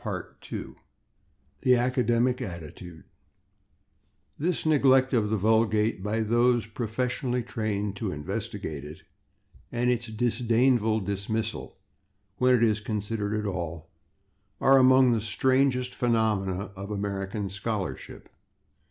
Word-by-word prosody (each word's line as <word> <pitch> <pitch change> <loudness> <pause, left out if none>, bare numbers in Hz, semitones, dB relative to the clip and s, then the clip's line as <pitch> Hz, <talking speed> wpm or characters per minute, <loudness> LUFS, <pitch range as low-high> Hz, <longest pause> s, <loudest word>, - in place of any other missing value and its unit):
§ 100 -6 -3 0.2
2 - - -7 0.9
/The 125 -1 +5
Academic 125 0 +1
Attitude/ 85 - -8 1.4
This 170 +3 -1
neglect 135 -3 +4
of 110 -4 +2
the 110 - +1
vulgate 110 0 +2
by 105 +3 -1
those 120 +1 +2
professionally 120 +3 -2
trained 105 -3 -3
to 105 -4 -3
investigate 75 0 -5
it, 75 +2 -10 0.7
and 120 +1 +1
its 120 -1 -1
disdainful 115 0 +1
dismissal 100 +3 -3 0.6
when 125 +2 +4
it 120 - +2
is 110 -2 +3
considered 105 0 -2
at 105 - -4
all, 85 -4 -5 0.7
are 135 0 +6
among 130 -1 +6
the 115 -2 +1
strangest 125 +3 +1
phenomena 105 -5 0
of 100 +1 -7
American 100 0 -3
scholarship. 100 0 -5
110 Hz, 110 wpm, -27 LUFS, 100-125 Hz, 1.4 s, are